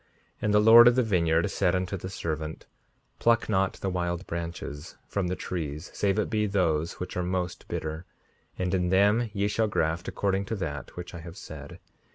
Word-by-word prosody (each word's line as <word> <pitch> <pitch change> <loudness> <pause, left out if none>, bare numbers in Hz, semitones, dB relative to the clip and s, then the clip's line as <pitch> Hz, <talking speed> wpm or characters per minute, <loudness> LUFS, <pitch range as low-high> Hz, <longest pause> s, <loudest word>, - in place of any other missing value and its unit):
5:57 - - -38 0.3
And 105 - +1
the - - +7
Lord 115 +3 +9
of 120 - +6
the 130 - +3
vineyard 85 -6 +2
said - - +2
unto 90 +1 -1
the 95 0 -6
servant: 80 -4 -4 0.5
Pluck 115 0 +3
not 95 -2 +1
the 95 - -4
wild 85 0 -2
branches 85 -3 -6
from 100 -3 -1
the 90 - -1
trees, 80 -3 -5
save 100 0 +1
it 105 - +1
be 105 -1 0
those 85 -5 +1
which 90 - -6
are 90 - 0
most 90 0 -3
bitter; 80 +2 -4 0.5
and 90 0 -1
in 90 -2 +1
them 105 +5 +3
ye 100 0 0
shall 110 +2 +1
graft 80 -3 -1
according 100 0 0
to 110 - -3
that 75 -8 -5
which 90 0 -7
I 85 - -7
have 85 +2 -10
said. 75 -5 -9
90 Hz, 200 wpm, -27 LUFS, 85-100 Hz, 0.5 s, Lord